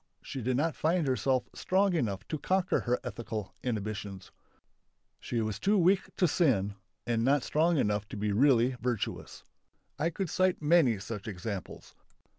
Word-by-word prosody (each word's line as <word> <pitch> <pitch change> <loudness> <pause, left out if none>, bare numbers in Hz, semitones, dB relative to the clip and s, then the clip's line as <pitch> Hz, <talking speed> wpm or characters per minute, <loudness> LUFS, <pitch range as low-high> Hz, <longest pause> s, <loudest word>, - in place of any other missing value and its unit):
She 135 - -6
did 125 +2 0
not 160 +3 0
find 165 +1 +1
herself 130 -1 +1
strong 195 +1 +1
enough 110 - -2
to 155 - -3
conquer 185 +4 +1
her 125 0 0
ethical 115 -4 -5
inhibitions. 105 -4 -4 0.9
She 120 -2 -2
was 110 -2 -3
too 205 +2 +2
weak 185 +1 +3
to 180 - +3
sin 120 - +2 0.3
and 115 -1 0
not 140 +1 +3
strong 165 +2 +2
enough 105 -4 0
to - - -6
be 105 0 -1
really 125 +2 +4
virtuous. 120 -3 -3 0.6
I 160 - +2
could 175 0 -4
cite 185 0 +2
many 150 -7 +4
such 100 +1 -7
examples. 100 -1 -6
125 Hz, 155 wpm, -30 LUFS, 105-165 Hz, 0.9 s, really